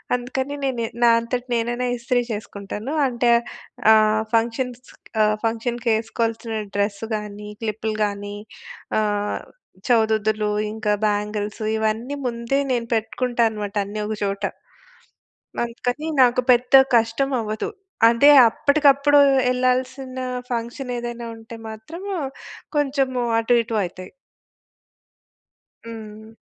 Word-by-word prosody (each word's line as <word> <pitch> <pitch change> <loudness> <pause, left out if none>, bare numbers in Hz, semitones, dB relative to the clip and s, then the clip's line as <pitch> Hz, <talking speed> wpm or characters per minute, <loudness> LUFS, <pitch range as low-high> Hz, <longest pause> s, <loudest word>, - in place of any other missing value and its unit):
అందుకని 260 +3 -3
నేను 255 -4 -1 0.2
నా 240 - +7
అంతట 240 +2 -3
నేనైనా 240 +1 -1
ఇస్త్రీ 245 +1 0
చేసుకుంటాను. 210 +3 -6
అంటే 245 -2 +1 0.6
ఆహ్, 215 0 +4
ఫంక్షన్స్ 235 +2 0 0.4
ఆహ్, 215 0 +3
ఫంక్షన్‌కి 230 +1 -1
ఏసుకోవాల్సిన 225 0 -3 0.2
డ్రెస్ 200 0 -1
కానీ, 210 0 -6
క్లిప్పులు 220 0 -2
కాని, 205 0 -5 0.6
ఆహ్, 205 -1 -1 0.5
చౌదుదులు, 220 -2 +2 0.2
ఇంకా 220 -1 0
బ్యాంగిల్స్ 210 +1 -2 0.2
ఇవన్నీ 220 +5 -1
ముందే 235 +3 -1
నేను 235 -2 -1
పెట్టుకుంటాను 230 0 0
మాట 205 0 -6
అన్నీ 205 +2 -6
ఒక 215 - -2
చోట. 200 0 -2 1.2
అందుకని 245 +5 -3 0.2
నాకు 250 0 +4
పెద్ద 245 +2 +1 0.2
కష్టం 230 +4 +1
అవ్వదు. 215 - -3 0.4
అదే 280 +5 +6 0.2
అప్పటికప్పుడు 285 +2 +4 0.3
ఎళ్ళాల్సిన 255 +1 -1 0.3
ఫంక్షన్ 240 +2 -4
ఏదైనా 240 0 -5
ఉంటే 225 +1 -11 0.2
మాత్రం 220 - -9 0.7
కొంచెం 275 -2 +1 0.3
అటు 230 +2 +2
ఇటు 225 0 -4
అయితాయి. 185 +1 -8 1.8
హ్మ్. 220 -1 -9
230 Hz, 105 wpm, -22 LUFS, 215-250 Hz, 1.8 s, నా